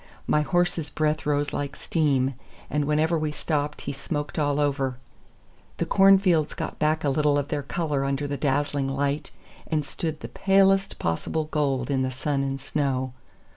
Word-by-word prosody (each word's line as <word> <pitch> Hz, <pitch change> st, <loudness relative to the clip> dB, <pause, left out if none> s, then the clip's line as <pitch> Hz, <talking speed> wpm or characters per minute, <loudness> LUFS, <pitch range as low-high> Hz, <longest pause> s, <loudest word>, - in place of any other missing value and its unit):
My 150 Hz, -, +3 dB
horse's 175 Hz, -1 st, 0 dB
breath 155 Hz, 0 st, 0 dB
rose 145 Hz, 0 st, +1 dB
like 140 Hz, 0 st, -3 dB
steam, 140 Hz, -6 st, +1 dB, 0.4 s
and 150 Hz, -1 st, +1 dB
whenever 155 Hz, +3 st, +2 dB
we 155 Hz, -1 st, -1 dB
stopped 150 Hz, -1 st, -2 dB
he 140 Hz, -, -4 dB
smoked 145 Hz, +2 st, -3 dB
all 145 Hz, -1 st, +1 dB
over. 135 Hz, -3 st, 0 dB, 0.8 s
The 170 Hz, -, 0 dB
cornfields 190 Hz, -3 st, +4 dB
got -, -, -5 dB
back 155 Hz, +1 st, +1 dB
a 145 Hz, -, +2 dB
little 150 Hz, 0 st, +2 dB
of 145 Hz, 0 st, -2 dB
their 145 Hz, -, -1 dB
color 145 Hz, -1 st, -1 dB
under 135 Hz, +1 st, -1 dB
the 140 Hz, -, -2 dB
dazzling 145 Hz, 0 st, 0 dB
light, 140 Hz, +2 st, -1 dB, 0.4 s
and 155 Hz, -2 st, 0 dB
stood 155 Hz, 0 st, -4 dB
the -, -, -5 dB
palest 195 Hz, 0 st, +3 dB
possible 85 Hz, -, -1 dB
gold 140 Hz, -4 st, -1 dB
in 135 Hz, -1 st, +1 dB
the 130 Hz, -, 0 dB
sun 135 Hz, +2 st, -1 dB
and 135 Hz, 0 st, -2 dB
snow. 130 Hz, -2 st, -1 dB
145 Hz, 170 wpm, -25 LUFS, 140-155 Hz, 0.8 s, cornfields